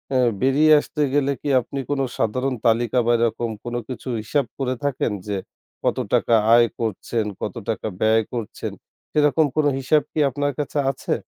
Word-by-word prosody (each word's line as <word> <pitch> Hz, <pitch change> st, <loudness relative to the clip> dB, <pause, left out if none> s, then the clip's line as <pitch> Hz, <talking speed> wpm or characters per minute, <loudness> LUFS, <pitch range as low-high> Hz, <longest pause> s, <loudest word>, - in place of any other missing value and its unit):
আ -, -, +4 dB, 0.2 s
বেরিয়ে 145 Hz, +4 st, +4 dB
আসতে 150 Hz, -, -4 dB
গেলে 140 Hz, -1 st, +2 dB
কি 145 Hz, -, -3 dB
আপনি 135 Hz, +3 st, -6 dB
কোন 145 Hz, -1 st, 0 dB, 0.2 s
সাধারণ 130 Hz, +4 st, 0 dB
তালিকা 115 Hz, +2 st, +2 dB
বা 120 Hz, -, +3 dB
এরকম 115 Hz, 0 st, 0 dB
কোন 120 Hz, 0 st, -5 dB
কিছু 130 Hz, +1 st, -6 dB
হিসাব 140 Hz, +5 st, 0 dB
করে 130 Hz, -1 st, -1 dB
থাকেন 140 Hz, -5 st, 0 dB, 0.2 s
যে 100 Hz, -1 st, -1 dB, 0.5 s
কত -, -, +1 dB, 0.2 s
টাকা -, -, +3 dB, 0.2 s
আয় 120 Hz, 0 st, +6 dB
করছেন, 110 Hz, 0 st, -2 dB, 0.2 s
কত 105 Hz, -, -3 dB
টাকা 110 Hz, -, -2 dB
ব্যয় 110 Hz, +1 st, +4 dB
করছেন 115 Hz, -4 st, -4 dB, 0.4 s
সেরকম 150 Hz, +1 st, +3 dB
কোন 155 Hz, -, +2 dB
হিসাব 150 Hz, +3 st, +3 dB
কি -, -, -3 dB
আপনার 145 Hz, +2 st, -1 dB
কাছে 145 Hz, 0 st, -2 dB
আছে? 135 Hz, -, -3 dB
130 Hz, 170 wpm, -22 LUFS, 115-145 Hz, 0.5 s, আয়